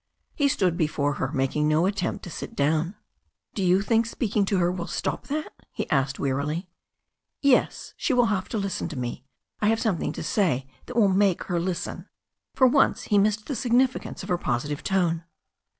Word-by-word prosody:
He 285 Hz, -, +2 dB
stood 185 Hz, -10 st, +1 dB
before 145 Hz, -2 st, 0 dB
her, 130 Hz, -, -1 dB
making 145 Hz, +1 st, 0 dB
no 155 Hz, +3 st, +3 dB
attempt 190 Hz, -2 st, -1 dB
to 175 Hz, -, -7 dB
sit -, -, -7 dB
down. 155 Hz, +6 st, +1 dB, 0.6 s
"Do 200 Hz, -, -3 dB
you 185 Hz, +2 st, +4 dB
think 225 Hz, +1 st, +2 dB
speaking 215 Hz, -3 st, 0 dB
to 195 Hz, 0 st, +1 dB
her 175 Hz, -1 st, +2 dB
will 175 Hz, -2 st, -4 dB
stop -, -, -3 dB
that?" 305 Hz, +2 st, -3 dB, 0.2 s
he -, -, -4 dB
asked 135 Hz, -1 st, +1 dB
wearily. 145 Hz, +6 st, -1 dB, 0.8 s
''Yes. 280 Hz, -3 st, +2 dB
She -, -, 0 dB
will 245 Hz, -4 st, +3 dB
have 185 Hz, -2 st, -3 dB
to 225 Hz, -, -2 dB
listen 195 Hz, -4 st, -2 dB
to 155 Hz, -, -7 dB
me. 125 Hz, +1 st, -4 dB, 0.4 s
I 210 Hz, -, +3 dB
have 225 Hz, +1 st, +3 dB
something 215 Hz, -9 st, 0 dB
to -, -, -5 dB
say 155 Hz, -, +1 dB, 0.2 s
that 250 Hz, -, -7 dB
will 225 Hz, -4 st, +5 dB
make 195 Hz, -1 st, +2 dB
her 175 Hz, -2 st, -1 dB
listen." 175 Hz, 0 st, -4 dB, 0.5 s
For 260 Hz, -, +5 dB
once 260 Hz, -4 st, +3 dB
he 205 Hz, -, +6 dB
missed 210 Hz, +1 st, +1 dB
the 280 Hz, -, -3 dB
significance 250 Hz, +2 st, +1 dB
of -, -, -8 dB
her 180 Hz, -1 st, +1 dB
positive 145 Hz, +3 st, -2 dB
tone. 175 Hz, -4 st, +1 dB
185 Hz, 190 wpm, -26 LUFS, 155-220 Hz, 0.8 s, he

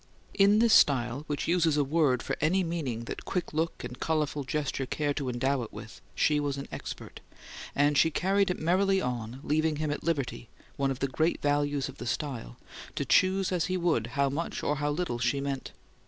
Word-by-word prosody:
In 200 Hz, +1 st, +5 dB
this 230 Hz, 0 st, +4 dB
style, 130 Hz, 0 st, +4 dB
which 145 Hz, -1 st, -2 dB
uses 165 Hz, -3 st, +3 dB
a 145 Hz, -, +3 dB
word 140 Hz, -4 st, +2 dB
for -, -, -2 dB
any 180 Hz, +5 st, +3 dB
meaning 150 Hz, -9 st, -3 dB
that -, -, -6 dB
quick 180 Hz, -4 st, -3 dB
look 160 Hz, +2 st, -1 dB
and -, -, -7 dB
colourful 150 Hz, -3 st, -1 dB
gesture 135 Hz, -1 st, -2 dB
care 145 Hz, +1 st, -1 dB
to 140 Hz, -3 st, -3 dB
endow 130 Hz, +2 st, 0 dB
it 115 Hz, -, -6 dB
with, -, -, -10 dB
she 150 Hz, -1 st, +3 dB
was 145 Hz, -1 st, -2 dB
an 140 Hz, -, -6 dB
expert; -, -, -7 dB, 0.6 s
and 145 Hz, +1 st, +3 dB
she 160 Hz, -, +5 dB
carried 195 Hz, +4 st, +1 dB
it 180 Hz, -, -1 dB
merrily 190 Hz, +4 st, +2 dB
on, 125 Hz, -2 st, -4 dB
leaving 155 Hz, +1 st, +1 dB
him 150 Hz, 0 st, -2 dB
at 145 Hz, -, -4 dB
liberty 140 Hz, -7 st, -2 dB, 0.3 s
(one 140 Hz, -1 st, 0 dB
of 135 Hz, -1 st, -4 dB
the 140 Hz, -, +2 dB
great 160 Hz, +6 st, 0 dB
values 145 Hz, -1 st, +1 dB
of 135 Hz, -, -11 dB
the -, -, -5 dB
style) 120 Hz, -, -4 dB, 0.4 s
to -, -, -1 dB
choose 190 Hz, 0 st, +3 dB
as 180 Hz, -2 st, +1 dB
he 185 Hz, -, -1 dB
would 165 Hz, -11 st, +1 dB
how 140 Hz, 0 st, +3 dB
much 150 Hz, +5 st, -3 dB
or 150 Hz, -, 0 dB
how 145 Hz, 0 st, 0 dB
little 145 Hz, -5 st, -2 dB
she 125 Hz, +4 st, +1 dB
meant. 140 Hz, -1 st, -4 dB
145 Hz, 205 wpm, -29 LUFS, 135-165 Hz, 0.6 s, In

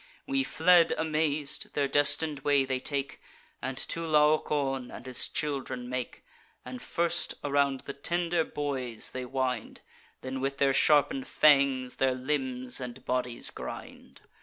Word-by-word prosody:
We 275 Hz, 0 st, 0 dB
fled 175 Hz, -5 st, +4 dB
amaz'd; 155 Hz, -2 st, -1 dB
their 140 Hz, -1 st, +1 dB
destin'd 145 Hz, +1 st, +3 dB
way 140 Hz, -1 st, +2 dB
they 130 Hz, -1 st, -1 dB
take, 140 Hz, +1 st, -3 dB, 0.4 s
And 130 Hz, 0 st, -4 dB
to 165 Hz, +4 st, -2 dB
Laocoon 150 Hz, -4 st, +1 dB
and -, -, -10 dB
his 130 Hz, -1 st, +1 dB
children 130 Hz, -4 st, -2 dB
make; 125 Hz, 0 st, -5 dB, 0.4 s
And 125 Hz, 0 st, -8 dB
first 170 Hz, 0 st, +1 dB
around 140 Hz, -2 st, +1 dB
the -, -, -7 dB
tender 170 Hz, +3 st, 0 dB
boys 130 Hz, -7 st, -3 dB
they 130 Hz, 0 st, -5 dB
wind, 130 Hz, -2 st, -3 dB, 0.4 s
Then 130 Hz, 0 st, -5 dB
with 135 Hz, +1 st, -2 dB
their 140 Hz, -1 st, +3 dB
sharpen'd 145 Hz, -2 st, +3 dB
fangs 135 Hz, -4 st, +3 dB
their 130 Hz, -1 st, +1 dB
limbs 130 Hz, -2 st, -2 dB
and 125 Hz, -1 st, -8 dB
bodies 125 Hz, -1 st, -1 dB
grind. 65 Hz, -, -9 dB
140 Hz, 135 wpm, -28 LUFS, 130-150 Hz, 0.4 s, fled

